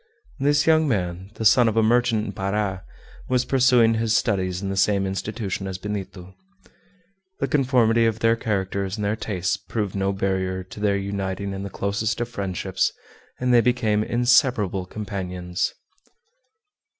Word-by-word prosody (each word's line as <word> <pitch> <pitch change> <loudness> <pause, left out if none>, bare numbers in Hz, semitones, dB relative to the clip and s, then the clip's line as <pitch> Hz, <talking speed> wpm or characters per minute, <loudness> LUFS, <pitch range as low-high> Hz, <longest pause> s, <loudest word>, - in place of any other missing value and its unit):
This 145 +1 +2
young 160 -1 +4
man, 95 -5 -2
the 110 - -4
son 120 +2 +6
of 110 - -3
a 110 - +4
merchant 115 -1 +2
in 100 - -4
Para, 95 -1 -2 0.5
was 125 -1 +2
pursuing 125 -4 +4
his 110 0 +1
studies 95 -6 0
in 95 0 -4
the 95 - -2
same 100 0 +2
institution 95 0 -3
as 95 -1 -4
Benito. 95 -2 -6 1.1
The 135 - 0
conformity 120 -5 +3
of 110 -1 -1
their 115 0 +3
characters 100 -3 -2
and 105 - -2
their 105 +1 0
tastes 95 -5 -2
proved 105 -4 -4
no 95 0 0
barrier 95 -1 -1
to 95 +3 -12
their 100 -1 +1
uniting 100 0 -3
in 95 - -5
the 100 - -5
closest 100 +5 -2
of 120 0 -2
friendships, 95 -4 -1 0.5
and 125 0 +1
they 120 - +7
became 115 -4 +1
inseparable 120 -6 +2
companions. 90 -4 -3
105 Hz, 155 wpm, -23 LUFS, 95-115 Hz, 1.1 s, they